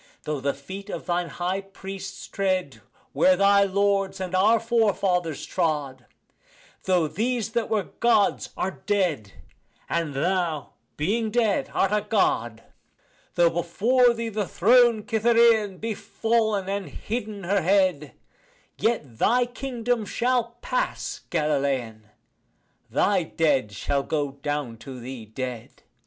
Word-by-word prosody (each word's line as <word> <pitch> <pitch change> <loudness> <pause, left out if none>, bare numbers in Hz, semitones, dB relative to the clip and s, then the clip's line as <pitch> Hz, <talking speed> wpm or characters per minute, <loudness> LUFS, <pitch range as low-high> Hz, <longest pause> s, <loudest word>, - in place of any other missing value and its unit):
Though 150 -2 -3
the 140 +1 -1
feet 190 +9 -9
of - - -5
thine 175 -1 -1
high 185 +2 -2
priests 195 0 -8
tread 190 -2 -1 0.3
where 280 0 +5
thy 200 0 +5
lords 195 0 +1
and 185 -1 -4
our 210 +5 +4
forefathers 200 - +1
trod, 145 -8 -2 0.8
Though 180 -4 +2
these 225 +6 -1
that 235 -1 -1
were 215 -3 +1
Gods 215 0 +1
are 190 - -3
dead, 175 - 0 0.5
and 165 -4 -2
thou 170 -1 -1 0.2
being 215 +9 0
dead 220 -2 +1
art 195 - +1
a 210 0 +2
God, 120 - 0 0.7
Though 170 -1 +4
before 235 +9 +2
thee 230 0 -3
the 210 -3 -2
throned 235 +4 +4
Cytherean 225 -3 +3
be 225 +2 -3
fallen, 220 -3 0
and 200 -1 -3
hidden 215 -3 -5
her 195 +2 +1
head, 185 -5 +2 0.7
Yet 145 - -1
thy 245 +2 +3
kingdom 245 -2 -2
shall 240 0 0
pass, - - -2
Galilean, 135 -8 -1 0.8
thy 200 -2 +2
dead 150 -9 +1
shall 140 +8 -1
go 145 -1 -2
down 140 -4 -4
to 130 +2 -9
thee 120 -2 -8
dead. 125 0 -7
195 Hz, 125 wpm, -25 LUFS, 150-220 Hz, 0.8 s, where